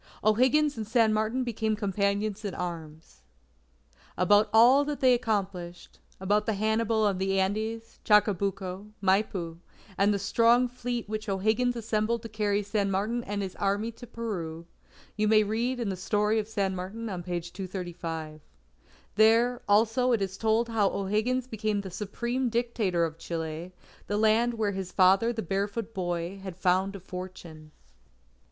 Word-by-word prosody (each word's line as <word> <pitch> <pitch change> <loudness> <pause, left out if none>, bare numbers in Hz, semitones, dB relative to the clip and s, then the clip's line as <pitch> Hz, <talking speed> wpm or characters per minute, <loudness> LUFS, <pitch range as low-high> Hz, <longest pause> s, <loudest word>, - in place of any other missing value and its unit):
O'Higgins 255 +6 +3
and 215 -2 -4
San 225 -1 +3
Martin 220 +4 0
became 220 -2 -1
companions 205 +1 -1
in 200 -3 -4
arms. 160 - -7 1.0
About 205 +4 +4
all 245 +6 +6
that 290 0 -4
they 255 -1 +5
accomplished, 195 -7 -3 0.2
about 205 +3 +1
the 220 - +1
Hannibal 220 +1 +1
of 195 -3 +1
the 195 0 +1
Andes, 220 +4 -2
Chacabuco, 200 -1 +1
Maipu, 190 -4 0 0.4
and 200 +1 +4
the 205 - +1
strong 230 +5 +3
fleet 245 -2 -4
which 215 0 -4
O'Higgins 220 +6 +1
assembled 225 0 -1
to 230 - -7
carry 210 -1 0
San 200 0 -1
Martin 215 +5 -1
and 205 0 -3
his 190 -1 -6
Army 205 +3 0
to 240 +2 -12
Peru, 170 -9 -5 0.5
you 215 -1 +1
may 215 0 +5
read 235 +5 -1
in 230 -4 -1
the 190 - -2
story 210 +4 +1
of 210 - -3
San 200 -4 -1
Martin 195 +6 -5
on 185 -4 -4
page 175 -1 -5
235. 170 -4 -6 0.7
There, 230 +4 +4
also, 225 +4 +3
it 225 - +1
is 190 0 -4
told 225 +2 +1
how 220 -4 +2
O'Higgins 215 +6 -1
became 215 -4 -2
the 190 -2 -8
Supreme 235 +7 -2
Dictator 225 -7 0
of 160 0 -7
Chile, 165 +1 -5 0.4
the 205 - -1
land 220 +2 +3
where 215 -2 0
his 190 -2 -5
father 195 +5 +4
the 225 -2 -4
barefoot 200 +4 -3
boy, 175 0 -3
had 190 -2 -7
found 185 +1 +1
a - - -7
fortune. 180 -4 -9
205 Hz, 155 wpm, -28 LUFS, 190-225 Hz, 1.0 s, all